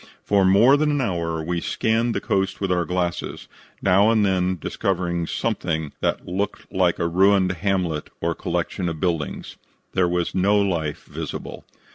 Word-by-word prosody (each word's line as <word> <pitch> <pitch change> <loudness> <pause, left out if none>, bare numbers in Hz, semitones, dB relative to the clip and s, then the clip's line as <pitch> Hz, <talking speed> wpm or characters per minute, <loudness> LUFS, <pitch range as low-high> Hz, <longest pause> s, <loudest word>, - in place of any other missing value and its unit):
For 100 -1 +3
more 105 +9 +6
than 150 +1 +1
an 145 -1 +1
hour 85 -8 -1
we 85 +1 -2
scanned 115 +5 0
the - - +1
coast 95 -1 -1
with 95 -2 -1
our 90 -1 +1
glasses, 90 +1 -3 0.4
now 100 +3 +5
and 110 -2 +3
then 95 -1 +1
discovering 85 -1 -1
something 80 -10 -2
that - - -1
looked 95 +3 -4
like - - +2
a 85 - 0
ruined 95 +2 +4
hamlet 90 -4 -1
or 85 0 0
collection 85 +2 -2
of 80 -2 -5
buildings. 85 -4 -2 0.4
There 90 -2 +2
was 90 -1 -1
no 100 +2 +3
life 85 -7 -1
visible. - - -7
90 Hz, 160 wpm, -23 LUFS, 85-100 Hz, 0.4 s, more